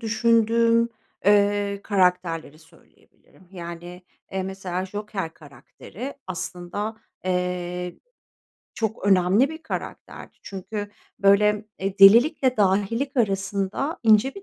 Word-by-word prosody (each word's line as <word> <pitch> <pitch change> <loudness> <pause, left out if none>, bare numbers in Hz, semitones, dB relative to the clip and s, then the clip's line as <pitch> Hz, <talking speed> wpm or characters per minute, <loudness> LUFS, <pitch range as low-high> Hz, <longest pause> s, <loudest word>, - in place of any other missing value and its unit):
düşündüğüm, 230 0 +3 0.4
eee, 205 0 +3
karakterleri 180 -6 0
söyleyebilirim. 165 +2 -24
Yani, 175 0 -8 0.3
eee, 190 0 -1
mesela 190 -1 -4
Joker 205 -4 -5
karakteri 160 - -10
aslında, 185 +4 -5 0.3
eee, 180 -1 -3 0.8
çok 220 -2 -3
önemli 195 +6 +4
bir 320 +1 -9
karakterdi. 320 - -7
Çünkü, 205 +2 -6 0.3
böyle, 210 +1 +3
eee, 195 +1 -3
delilikle 250 +6 +6
dahilik 210 +8 +1
arasında 200 - -1
ince 225 +3 +4
bir 395 - -10
200 Hz, 95 wpm, -24 LUFS, 180-225 Hz, 0.8 s, delilikle